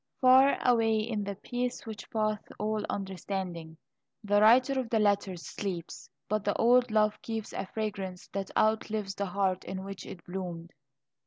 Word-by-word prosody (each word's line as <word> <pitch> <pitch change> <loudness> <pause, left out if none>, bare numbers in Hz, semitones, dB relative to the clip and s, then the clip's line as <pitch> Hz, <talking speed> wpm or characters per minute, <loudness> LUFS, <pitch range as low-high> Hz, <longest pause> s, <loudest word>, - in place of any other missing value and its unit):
Far 260 +2 +6
away 225 -2 +4
in 215 -1 -1
the 200 0 -4
"peace 245 +4 -3
which 220 -2 -8
passeth 215 -1 -1
all 215 0 -1
understanding," 185 -4 -4 0.5
the 205 0 +3
writer 255 +5 +5
of 250 -3 -3
the 225 - +2
letters 200 -4 +1
sleeps, 180 -5 -5 0.2
but 215 +1 0
the 205 - 0
old 245 +1 +5
love 215 -1 +2
keeps 225 -2 -5
a - - -4
fragrance 195 -4 -4
that 195 -1 -4
outlives 215 -2 +1
the 200 0 -3
heart 190 0 0
in 190 0 -5
which 195 0 -8
it 180 - -10
bloomed. 175 -2 -6
205 Hz, 160 wpm, -30 LUFS, 190-220 Hz, 0.5 s, Far